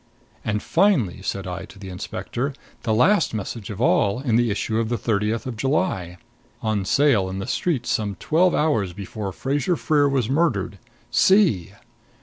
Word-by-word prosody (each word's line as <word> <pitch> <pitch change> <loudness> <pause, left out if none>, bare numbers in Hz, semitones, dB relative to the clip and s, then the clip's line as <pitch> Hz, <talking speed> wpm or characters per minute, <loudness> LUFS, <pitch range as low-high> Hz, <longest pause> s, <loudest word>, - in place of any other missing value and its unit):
"And 105 0 -1
finally," 165 - +2
said 100 0 -3
I 90 0 -5
to - - -15
the 95 -1 -9
inspector, 120 +8 -4 0.3
"the 115 - -1
last 155 - +3
message 105 0 -5
of 105 -1 -6
all, 110 -2 +2
in 125 -5 0
the 120 0 +3
issue 110 +2 -1
of 115 -1 -1
the 120 - 0
thirtieth 110 +3 -1
of 130 -3 -4
July 105 - -1 0.5
on 110 -3 0
sale 115 -6 +3
in 95 - -5
the 95 - -4
streets 140 -9 -1
some 105 -2 -1
twelve 175 - +2
hours 110 - +1
before 100 +1 -5
Fraser 145 - -1
Freer 145 -3 +2
was 130 -5 +1
murdered. 130 - 0 0.3
See!" 130 - +3
115 Hz, 165 wpm, -23 LUFS, 100-140 Hz, 0.5 s, last